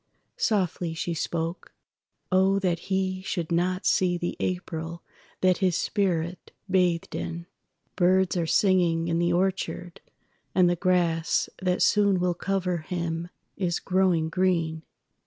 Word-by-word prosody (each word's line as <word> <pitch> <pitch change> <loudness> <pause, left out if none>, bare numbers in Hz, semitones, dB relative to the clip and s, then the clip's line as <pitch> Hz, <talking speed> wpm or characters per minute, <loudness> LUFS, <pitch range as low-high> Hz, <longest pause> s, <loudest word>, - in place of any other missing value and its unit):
Softly 180 -5 0
she 170 +1 -2
spoke: 165 +1 -4 0.6
"Oh, 190 +1 +4
that 180 -4 0
he 190 -1 0
should 175 -3 -3
not 180 +2 +1
seeThe 175 -2 +1
April 170 -2 -4 0.4
that 185 -1 +3
his 185 -4 +2
spirit 180 -4 -1 0.2
bathed 180 -3 +1
in! 170 0 -4 0.5
BirdsAre 180 -2 +2
singing 175 -4 +3
in 165 0 +1
the 175 0 +2
orchard, 180 -1 -1 0.5
and 185 -1 +5
the 175 - +2
grassThat 180 +1 +1
soon 200 -3 +3
will 180 0 +1
cover 180 0 -1
him 170 0 -4 0.3
is 175 -3 0
growing 180 -4 +1
green. 165 -3 0
180 Hz, 120 wpm, -26 LUFS, 170-185 Hz, 0.6 s, and